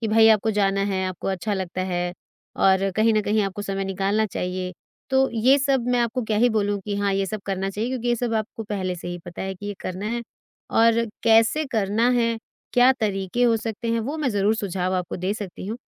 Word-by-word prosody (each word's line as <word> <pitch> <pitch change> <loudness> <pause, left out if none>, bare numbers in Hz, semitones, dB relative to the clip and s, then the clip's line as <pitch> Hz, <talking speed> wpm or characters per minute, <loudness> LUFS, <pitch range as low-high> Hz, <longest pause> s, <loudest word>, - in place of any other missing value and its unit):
कि 225 - -1
भई 225 +1 +6
आपको 220 0 +4
जाना 195 -2 +1
है, 190 -2 -1
आपको 185 +1 -4
अच्छा 195 +2 -1
लगता 185 -1 -3
है 175 -1 -2 0.4
और 195 0 +3
कहीं 220 +1 +4
न 215 - +3
कहीं 210 +1 +1
आपको 195 +1 -3
समय 195 -1 -2
निकालना 195 +3 0
चाहिए। 180 -1 -3 0.4
तो 265 0 +4
ये 255 +5 +5
सब 270 -3 +1
मैं 245 - +2
आपको 240 +1 0
क्या 215 -1 -1
ही 245 +2 +5
बोलूँ 205 -2 0
कि 205 - -3
हाँ, 200 -1 +1
ये 195 0 0
सब 215 +1 -4
करना 195 0 -1
चाहिए 215 +5 -2
क्योंकि 245 -2 -2
ये 240 - +2
सब 235 -1 -1
आपको 220 +1 -3
पहले 190 -3 -2
से 175 - -7
ही 175 0 -5
पता 175 +1 -7
है 190 0 -3
कि 205 +3 -9
ये 205 - -3
करना 185 +3 -4
है। 235 +1 -2 0.6
और 230 0 +5 0.2
कैसे 225 +7 +4
करना 220 +2 +2
है, 230 -2 +2 0.4
क्या 250 +2 +6
तरीके 200 +2 -1
हो 230 -2 +4
सकते 225 +1 -4
हैं, 230 - +1
वो 280 +8 -3
मैं 295 -4 0
ज़रूर 205 +1 +2
सुझाव 185 -3 -2
आपको 180 -1 -2
दे 185 +2 -1
सकती 195 -3 -7
हूँ 220 +3 -3
210 Hz, 230 wpm, -24 LUFS, 195-230 Hz, 0.6 s, भई